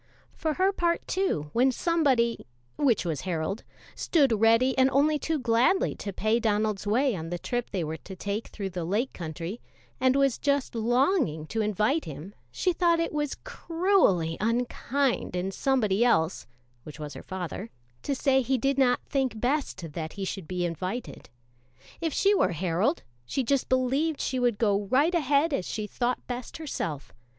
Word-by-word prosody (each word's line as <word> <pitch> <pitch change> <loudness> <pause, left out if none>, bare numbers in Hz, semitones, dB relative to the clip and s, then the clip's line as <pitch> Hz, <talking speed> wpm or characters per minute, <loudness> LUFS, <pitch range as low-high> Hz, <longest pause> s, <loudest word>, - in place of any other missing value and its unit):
For 310 -2 -2
her 380 +1 +2
part, 340 -2 0
too, 160 - -1
when 255 +3 +4
somebody 260 - +1 0.3
(which 255 -10 +2
was 160 -4 -2
Harold) 180 +4 -3 0.3
stood 270 -10 +2
ready 230 +4 +5
only 280 +3 +3
too 320 +1 -1
gladly 245 +8 +2
to 200 - -5
pay 215 +4 +1
Donald's 210 -2 0
way 245 +3 +2
on 165 -2 -5
the 175 - -2
trip 245 +6 -3
they 185 -4 -2
were 160 +1 -4
to 190 - -10
take 205 +4 -3
through 195 -2 -5
the 180 -1 -4
Lake 210 +10 -1
Country, 170 +5 -6 0.4
and 260 +1 +3
was 275 -3 +2
just 280 -2 0
longing 240 - +1
to 220 +7 -2
invite 215 - +1
him, 155 +6 -8 0.2
she 360 - 0
thought 340 -1 +3
it 330 - -1
was 295 -2 -2
cruelly 335 - +1
unkind 245 +1 0
in 180 +2 -1
somebody 225 -2 +1
else 180 -8 +2 0.3
(which 150 +4 -11
was 150 -2 -6
her 130 - -8
father) 190 +3 -5 0.3
to 280 - -2
say 265 0 +3
he 265 +1 +1
did 275 +3 0
not 250 -2 +3
think 265 -5 -1
best 245 - -2
that 160 0 -5
he 195 -1 -4
should 190 -3 -5
be 180 0 -2
invited. 185 +8 -5 0.7
If 325 -1 0
she 400 +7 +3
were 185 - +2
Harold, 185 - 0 0.2
she 255 - -2
just 275 +2 0
believed 270 +4 +1
she 260 - -1
would 240 -4 +2
go 205 -2 +1
right 280 - +3
ahead 295 -1 +2
as 185 - -1
she 215 -1 -3
thought 245 +3 -2
best 245 -1 -6
herself. 165 - -5
235 Hz, 170 wpm, -27 LUFS, 190-275 Hz, 0.7 s, ready